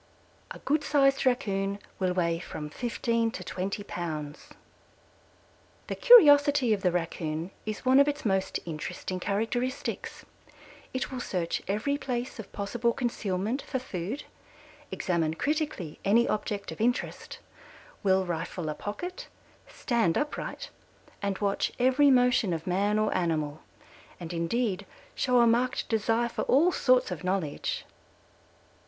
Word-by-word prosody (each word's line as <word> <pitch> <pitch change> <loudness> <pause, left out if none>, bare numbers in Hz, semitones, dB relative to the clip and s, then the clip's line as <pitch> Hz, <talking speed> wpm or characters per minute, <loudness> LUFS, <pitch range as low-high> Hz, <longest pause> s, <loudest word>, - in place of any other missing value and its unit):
A - - -7
good 295 +1 0
sized 275 -2 +3
Raccoon 200 -6 0 0.2
will 185 -2 +1
weigh 170 -2 +1
from 150 -3 -7
fifteen 230 0 0
to 195 - -7
twenty 195 +3 -4
pounds. 155 -6 -5 1.4
The - - -4
curiosity 290 - +7
of 200 - -2
the 180 - +2
Raccoon 165 0 -3 0.2
is 215 +2 -4
one 260 +1 +6
of 280 - +6
its 290 -3 -2
most 190 -2 0
interesting 175 +3 -5
characteristics. 225 +7 -2 0.7
It 260 - -3
will 260 - -4
search 180 -7 -2
every 230 +9 0
place 250 -2 -4
of 220 - -8
possible 235 +4 -1
concealment 225 0 -2
for - - -3
food, 220 +1 -5 0.7
examine 165 -4 0
critically 295 - -2
any 230 +4 +4
object 205 -1 -2
of - - -7
interest, 245 +2 -1 0.6
will 190 -1 +3
rifle 170 -1 -3
a - - -1
pocket, 360 - -6 0.4
stand 230 - 0
upright 295 0 -4 0.5
and 200 -1 -1
watch 200 -1 0
every 260 +3 +4
motion 250 -7 +4
of 160 -1 -4
man 200 +4 +1
or 215 0 +1
animal, 155 -4 -1 0.6
and 175 -1 -6
indeed 195 +3 -1 0.3
show 250 -2 +3
a - - +6
marked 245 +3 +1
desire 225 +1 +1
for 235 - -4
all 315 +8 +4
sorts 255 - +3
of 180 -1 -5
knowledge. 180 -5 -2
210 Hz, 135 wpm, -28 LUFS, 180-255 Hz, 1.4 s, curiosity